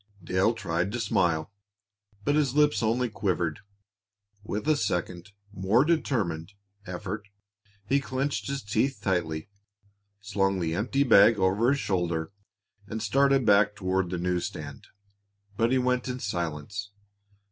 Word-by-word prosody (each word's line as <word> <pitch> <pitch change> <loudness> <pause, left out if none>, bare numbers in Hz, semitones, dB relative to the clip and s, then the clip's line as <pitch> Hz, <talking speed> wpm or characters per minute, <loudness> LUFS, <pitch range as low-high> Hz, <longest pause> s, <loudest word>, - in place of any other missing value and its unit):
Dale 95 +6 +1
tried 85 -2 -1
to 120 - -2
smile, 90 -5 0 0.7
but 145 - +1
his 145 -3 +1
lips 150 -2 +3
only 120 +3 +1
quivered. 95 -6 -1 0.8
With 105 +5 -4
a 155 - +4
second, 90 - -2 0.2
more 105 +8 +3
determined, 100 - -1 0.3
effort, 100 +3 -5 0.6
he 140 +7 +2
clenched 135 +1 -2
his 140 0 -3
teeth 125 +6 0
tightly, 85 -6 -1 0.7
slung 95 -1 0
the 80 -2 -1
empty 125 +9 +1
bag 110 -3 +6
over 100 +5 +2
his 140 0 +2
shoulder, 85 -5 -1 0.6
and 110 +1 -4
started 135 +4 +3
back 105 0 +4
toward 95 -2 -1
the 90 - -3
news 90 0 -1
stand. - - -9 0.7
But 115 +3 +1
he 130 - +3
went 125 0 0
in 125 0 -3
silence. 90 0 -4
100 Hz, 135 wpm, -27 LUFS, 90-125 Hz, 0.8 s, bag